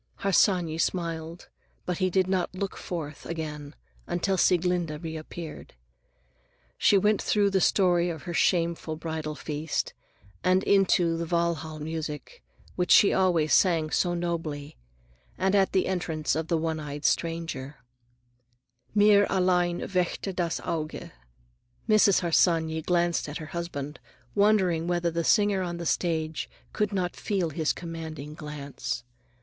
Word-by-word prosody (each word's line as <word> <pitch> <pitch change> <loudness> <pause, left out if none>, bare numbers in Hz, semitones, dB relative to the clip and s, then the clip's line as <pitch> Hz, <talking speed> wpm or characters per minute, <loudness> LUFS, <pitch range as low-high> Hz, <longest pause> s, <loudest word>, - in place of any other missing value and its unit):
Harsanyi 180 -4 +2
smiled, 165 -1 -2 0.4
but 180 0 -2
he 185 -1 +2
did 185 +1 +2
not 185 -1 -1
look 195 +1 -3
forth 155 -4 -6
again 150 -3 -5 0.3
until 175 +3 0
Sieglinde 175 -3 +1
reappeared. 160 - -7 1.0
She 200 - +4
went 210 +2 +2
through 205 -1 +2
the 190 -1 +2
story 175 -3 +3
of 160 -3 -6
her 175 - -5
shameful 170 -2 +1
bridal 160 -1 -4
feast 150 +1 -3 0.5
and 185 +1 +3
into 180 -4 +3
the 170 0 -3
Walhall' 170 -2 -1
music, 160 - -5 0.3
which 180 -1 -1
she 200 - +7
always 175 -5 +2
sang 165 -5 +3
so 175 -1 +1
nobly, 165 -4 -3 0.6
and 190 +1 +1
the 190 -1 +3
entrance 165 -5 -1
of 160 0 -2
the 170 - +1
one 160 0 -2
eyed 145 -1 -6
stranger:— 165 -5 -1 1.2
"Mir 205 -1 +6
allein 180 -2 +2
Weckte 185 +1 -1
das 170 -3 -1
Auge." 155 -2 -4 0.8
Mrs. 215 -3 +5
Harsanyi 165 -2 +2
glanced 175 -1 +1
at 145 - -5
her 155 -1 -9
husband, 150 -4 -5 0.3
wondering 190 -5 +3
whether 175 -1 0
the 170 0 -1
singer 205 0 +3
on 175 -1 -3
the 170 - -5
stage 160 -2 -1 0.2
could 210 -1 0
not 185 -3 -1
feel 185 -6 -1
his 155 0 0
commanding 160 -3 -7
glance. 145 -5 -5
170 Hz, 135 wpm, -27 LUFS, 160-185 Hz, 1.2 s, she